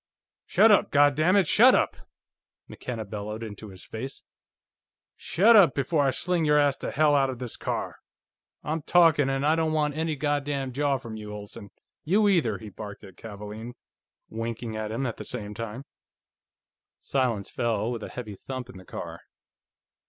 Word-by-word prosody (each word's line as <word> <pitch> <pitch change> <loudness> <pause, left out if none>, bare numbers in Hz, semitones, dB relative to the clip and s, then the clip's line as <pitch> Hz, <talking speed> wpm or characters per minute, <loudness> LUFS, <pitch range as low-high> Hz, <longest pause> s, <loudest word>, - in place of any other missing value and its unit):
"Shut 225 - +5
up, 205 - +4
goddammit, 155 +7 +4
shut - - +7
up!" - - +1 0.7
McKenna 115 -3 -6
bellowed 105 +2 -6
into 105 -1 -8
his 95 -1 -12
face. 130 +5 -7 0.9
"Shut 205 +8 +4
up 185 -9 +6
before 145 +2 +1
I - - +4
sling 170 +6 0
your 150 -1 +4
ass 145 -2 +3
to - - -5
hell 150 0 +3
out 135 -2 +3
of 130 - -5
this 125 -2 -5
car! - - -4 0.7
I'm 155 +1 -2
talking, 160 -4 +4
and 135 +1 -1
I 155 +2 +4
don't 160 -1 0
want 150 -1 +1
any 160 0 -1
goddam 145 -2 -1
jaw 140 +1 +1
from 115 -4 -8
you, 105 -1 -8
Olsen. 105 -1 -9 0.3
You 205 +6 +3
either," 150 - +2
he 110 0 -10
barked 105 0 -9
at 95 - -13
Kavaalen, 105 +2 -8 0.5
winking 115 0 -5
at 110 0 -4
him 120 +5 -2
at 115 - -3
the - - -7
same 105 0 -5
time. 115 +3 -6 1.2
Silence 120 -7 -1
fell 115 -1 -1
with 115 -2 -4
a - - -6
heavy 115 -4 -7
thump 130 +4 -7
in - - -13
the 95 - -13
car. - - -7
130 Hz, 170 wpm, -26 LUFS, 110-150 Hz, 1.2 s, shut